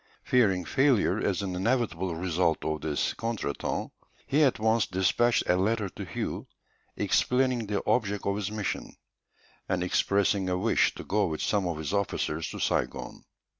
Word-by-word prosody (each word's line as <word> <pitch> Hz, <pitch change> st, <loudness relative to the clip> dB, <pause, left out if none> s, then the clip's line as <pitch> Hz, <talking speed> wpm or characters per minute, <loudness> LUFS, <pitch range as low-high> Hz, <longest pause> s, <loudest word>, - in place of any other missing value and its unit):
Fearing 95 Hz, -8 st, +2 dB
failure 135 Hz, -, +2 dB
as 100 Hz, +1 st, 0 dB
an 95 Hz, -2 st, -3 dB
inevitable 95 Hz, -4 st, 0 dB
result 85 Hz, -1 st, 0 dB
of 80 Hz, -1 st, -2 dB
this 75 Hz, -2 st, -1 dB
contretemps 115 Hz, -11 st, -3 dB, 0.3 s
he 145 Hz, +3 st, +2 dB
at 135 Hz, -4 st, +4 dB
once 110 Hz, +1 st, +2 dB
despatched 95 Hz, +6 st, +2 dB
a 90 Hz, -, +3 dB
letter 105 Hz, +2 st, 0 dB
to -, -, -8 dB
Hué, -, -, -4 dB, 0.5 s
explaining 125 Hz, -3 st, +1 dB
the 100 Hz, -1 st, -2 dB
object 105 Hz, -4 st, +1 dB
of 100 Hz, -, +1 dB
his 105 Hz, -1 st, -2 dB
mission, 105 Hz, -2 st, -4 dB, 0.7 s
and 90 Hz, -2 st, 0 dB
expressing 100 Hz, +1 st, +1 dB
a 90 Hz, -, 0 dB
wish 110 Hz, +5 st, +2 dB
to -, -, -7 dB
go 105 Hz, 0 st, +1 dB
with 80 Hz, -2 st, -3 dB
some 100 Hz, -3 st, +1 dB
of 85 Hz, -3 st, -2 dB
his 80 Hz, +3 st, -4 dB
officers 90 Hz, -5 st, -1 dB
to -, -, -7 dB
Saigon. -, -, -2 dB
100 Hz, 160 wpm, -28 LUFS, 90-115 Hz, 0.7 s, at